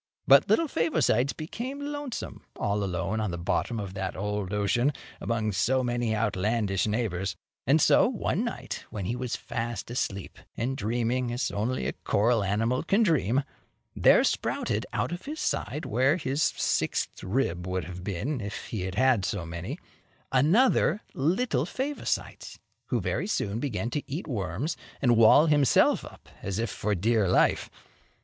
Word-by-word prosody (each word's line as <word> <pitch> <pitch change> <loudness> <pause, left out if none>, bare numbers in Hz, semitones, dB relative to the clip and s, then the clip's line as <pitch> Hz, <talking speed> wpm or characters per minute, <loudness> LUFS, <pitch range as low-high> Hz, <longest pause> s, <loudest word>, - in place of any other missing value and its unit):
But - - +6
little 330 - +3
Favosites 155 - +1
became 240 - -5
lonesome 290 -2 -5
all 100 0 -1
alone 95 +3 -2
on 105 -2 -1
the 85 - -4
bottom 110 +6 -1
of 100 -3 -5
that 95 -2 -3
old 105 -1 -3
ocean, 105 +7 +1 0.3
among 110 -2 -1
so 125 +8 +1
many 120 -2 0
outlandish 105 -1 0
neighbors; 100 -5 -1 0.3
and 145 +4 +5
so, - - +5
one - - -1
night, - - -5
when 100 -3 -5
he 115 - -1
was 125 -1 -3
fast 115 -1 -4
asleep, 100 -5 -3 0.2
and 130 +3 -1
dreaming 120 +2 -1
as 120 0 -1
only 115 +5 -1
a - - -1
coral 110 +1 +1
animal 115 +6 +1
can 200 +6 +2
dream, 140 - +2 0.5
there - - +6
sprouted - - -1
out - - -1
of 175 +1 -6
his 305 +2 -5
side, 150 +3 -2
where 130 - +2
his 140 -2 -2
sixth - - 0
rib 95 -4 -1
would 90 -1 -1
have 90 +2 -8
been 105 - -2
if 100 0 -6
he 110 - -3
had 95 0 -4
had 130 -4 +3
so 90 -2 -2
many, 85 +2 -5 0.5
another 195 - +3
little 160 - +1
Favosites, 275 - -3 0.3
who - - 0
very - - -2
soon 105 - -1
began 120 -3 -2
to 150 - -1
eat 155 +7 -3
worms 110 - -2 0.2
and 120 -3 +4
wall 115 +7 +7
himself 145 -4 +4
up - - -13
as 100 0 -3
if 115 -2 -1
for 105 0 -1
dear 110 +2 +2
life. 95 - +3
115 Hz, 160 wpm, -28 LUFS, 100-140 Hz, 0.5 s, wall